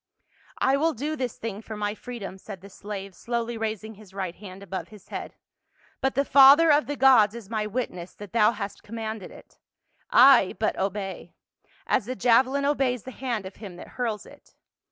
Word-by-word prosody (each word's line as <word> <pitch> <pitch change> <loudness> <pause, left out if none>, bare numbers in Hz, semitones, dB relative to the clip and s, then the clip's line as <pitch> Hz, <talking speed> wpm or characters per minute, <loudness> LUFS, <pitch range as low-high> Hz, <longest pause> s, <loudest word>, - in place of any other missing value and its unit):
" - - -30
I 270 +1 +3
will 320 +3 +2
do 295 +6 -3
this 255 -5 -4
thing 220 -2 -5
for 220 -1 -8
my 205 0 -1
freedom," 215 -5 -8
said 195 -2 -9
the 200 +1 -13
slave, 195 -1 -7
slowly 235 +3 -3
raising 220 -1 -4
his 200 -2 -16
right 190 -3 -3
hand 195 0 -11
above 190 -1 -5
his 210 -3 -16
head. - - -6 0.3
" - - -35
But 265 - 0
the 280 - +2
father 280 +5 +8
of 295 +1 +3
the 290 - -2
gods 250 -5 +5
is 225 -3 -10
my 215 -1 -1
witness 195 -6 -4
that 205 -3 -11
thou 220 -1 +5
hast 205 -2 -6
commanded 220 -2 -6
it. - - -16 0.5
I 255 -7 +6
but 220 - 0
obey 195 -2 -4 0.3
— - - -33
as 220 - +1
the 255 - -3
javelin 255 +4 +3
obeys 270 -5 +1
the 260 - -8
hand 240 -5 -3
of 190 - -9
him 200 -5 -9
that 175 - -11
hurls 230 -4 -3
it." - - -18
220 Hz, 200 wpm, -26 LUFS, 200-255 Hz, 0.5 s, father